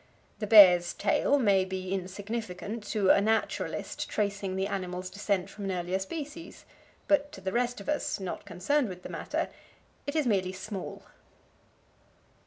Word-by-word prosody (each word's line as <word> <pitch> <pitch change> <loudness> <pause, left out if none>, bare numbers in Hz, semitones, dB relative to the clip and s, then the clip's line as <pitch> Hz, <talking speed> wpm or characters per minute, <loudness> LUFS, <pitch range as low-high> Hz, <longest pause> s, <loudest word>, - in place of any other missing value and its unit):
The 210 - -3
bear's 180 -5 +8
tail 285 - +2
may 200 -7 +4
be 185 0 -4
insignificant 205 +2 -4
to 205 -3 +3
a - - +5
naturalist 220 +2 -1
tracing 200 -2 -1
the 190 0 0
animal's 185 -2 -4
descent 200 -2 -1
from 200 0 -8
an 195 - -1
earlier 180 +1 -1
species, 300 - -7 0.4
but 290 0 +3
to - - -9
the 190 0 -3
rest 245 0 0
of - - -10
us, 300 -7 -1
not 190 -2 -5
concerned 240 - 0
with 180 -1 -9
the - - -7
matter, - - -2 0.6
it 285 - -3
is 310 -3 +2
merely 190 -5 +1
small. 190 +1 -6
200 Hz, 155 wpm, -29 LUFS, 185-225 Hz, 0.6 s, bear's